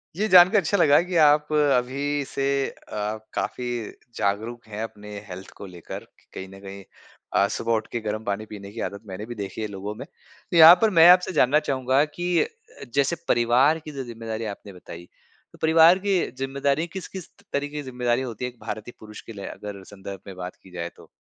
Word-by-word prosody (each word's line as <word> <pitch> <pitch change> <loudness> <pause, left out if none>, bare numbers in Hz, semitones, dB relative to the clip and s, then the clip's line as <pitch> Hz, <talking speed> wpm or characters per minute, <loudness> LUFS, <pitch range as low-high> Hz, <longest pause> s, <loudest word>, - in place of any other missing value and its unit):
ये 215 +3 0
जान 180 -2 +8
के 215 - +4
अच्छा 200 +1 +1
लगा 150 -2 +5
कि 180 0 -5
आप 150 +1 +3
अभी 140 0 +1
से 135 +1 -3 0.2
अ, 105 +1 -5 0.2
काफ़ी 125 -1 -3 0.5
जागरूक 110 +4 -2
हैं 110 +1 -5
अपने 105 -2 -9 0.2
हेल्थ 95 +1 -8
को 100 - -8
लेकर 90 -3 -9 0.3
कहीं 95 - -7
न 95 0 -13
कहीं 100 0 -9 0.5
अ, 100 - +4
सुबह 115 +3 -2
उठ 110 -1 -1
के 120 - -2
गरम 110 +1 -3
पानी 100 +2 -2
पीने 100 -2 -10
की 115 - -9
आदत 100 +1 -11
मैंने 95 +2 -6
भी 120 +1 -7
देखी 100 +1 -6
है 110 - -2
लोगों 100 +1 -6
में। - - -8
तो 170 - -8
यहाँ 165 +2 +11
पर 225 - +4
मैं 165 - +9
आपसे 180 +1 +6
जानना 150 0 +4
चाहूँगा 130 +1 +2
कि 175 0 -3 0.7
जैसे 140 +4 +2
परिवार 125 +7 +3
की 155 - -7
जो 135 -2 -5
ज़िम्मेदारी 115 -2 -6
आपने 100 - -13
बताई, 85 -1 -11 0.5
तो - - -17
परिवार 165 +3 +6
की 195 -2 +1 0.2
ज़िम्मेदारियाँ 140 +4 -1
किस-किस 190 -1 -7 0.2
तरीक़े 145 +1 -2
की - - -2
ज़िम्मेदारियाँ 125 0 -1
होती 120 +2 -5
है, 125 - -4
एक 120 - -29
भारतीय 110 +2 -6
पुरुष 105 -1 -11
के 115 - -11
लिए 100 -2 -8
अगर 100 -2 -8
संदर्भ 100 -1 -9
में 95 - -8
बात 90 0 -7
की 95 - -16
जाए 85 -1 -5
तो? - - -17
120 Hz, 205 wpm, -24 LUFS, 105-145 Hz, 0.7 s, यहाँ